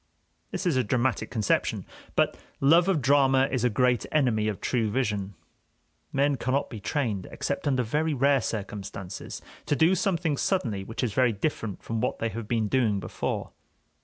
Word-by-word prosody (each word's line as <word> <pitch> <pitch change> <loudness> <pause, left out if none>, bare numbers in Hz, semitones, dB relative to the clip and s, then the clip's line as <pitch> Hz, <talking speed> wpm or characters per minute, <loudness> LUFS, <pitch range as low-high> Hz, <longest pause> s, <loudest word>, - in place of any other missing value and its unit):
This - - -4
is 165 -7 +2
a 130 - +3
dramatic 125 +3 0
conception; 110 -4 0 0.3
but - - +2 0.2
love 165 +6 +5
of 170 -8 +1
drama 135 -1 +4
is 130 -3 0
a 125 - +4
great 125 +2 +2
enemy 120 -8 +2
of 105 -2 -2
true 115 -4 0
vision. 105 -5 -1 0.8
Men 140 0 +2
cannot 130 +3 -1
be 115 - -6
trained, 110 - -2
except - - -3
under 130 -3 +2
very 150 +6 0
rare 140 0 +3
circumstances, 100 -4 -5 0.2
to 145 - +2
do 165 +5 +4
something 170 -5 0
suddenly 115 - 0
which 115 +5 -5
is 115 -5 -1
very 125 -1 +3
different 105 -2 -3
from 115 -1 -2
what - - -1
they 115 - -1
have 115 -1 -6
been 110 -2 +1
doing 110 -4 +2
before. - - -3
125 Hz, 170 wpm, -27 LUFS, 110-140 Hz, 0.8 s, love